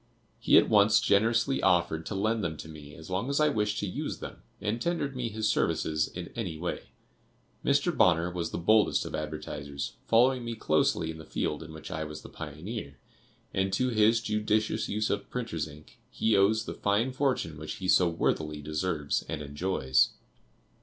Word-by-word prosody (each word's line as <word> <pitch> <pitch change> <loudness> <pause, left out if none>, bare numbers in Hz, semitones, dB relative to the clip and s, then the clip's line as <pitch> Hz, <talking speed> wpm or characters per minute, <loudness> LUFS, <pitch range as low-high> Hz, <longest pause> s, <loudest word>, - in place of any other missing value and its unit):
He - - +5
at - - +6
once 105 0 +5
generously 115 +6 +2
offered 85 -3 +2
to 105 - -4
lend 110 +3 0
them 80 -3 -2
to - - -8
me 75 -2 -11
as 80 +3 -11
long 100 +8 -1
as 140 - +1
I 150 0 +4
wished 105 -5 0
to - - -1
use 90 - -4
them - - -9 0.2
and 110 +3 -2
tendered 155 -5 -1
me 125 -2 -2
his 110 0 -1
services 80 -3 +1
in 90 -1 -8
any 90 -9 -3
way. 85 +2 -4 0.8
Mr. 140 +4 +2
Bonner 85 -2 +3
was 85 -2 -3
the - - -4
boldest 105 +6 +3
of - - -7
advertisers, 75 -2 -5
following 125 +2 +4
me 115 0 -4
closely 80 -3 +1
in 80 - -10
the - - -9
field 75 0 -2
in 80 0 -9
which 80 -1 -9
I 80 - -3
was 75 0 -8
the - - -10
pioneer, 80 -3 -7 0.6
and 95 0 0
to 130 0 +1
his 115 0 +4
judicious 105 0 0
use 105 +1 0
of 100 0 -3
printers' 115 -11 -3
ink, 75 0 -15
he 110 -1 +1
owes 105 +3 +3
the - - -5
fine 105 +6 +1
fortune 130 - -1
which 75 - -5
he 95 - -5
so 90 -1 +5
worthily 75 -2 -1
deserves 75 0 -1
and 80 -2 -3
enjoys. 70 -3 +1
95 Hz, 185 wpm, -29 LUFS, 80-110 Hz, 0.8 s, at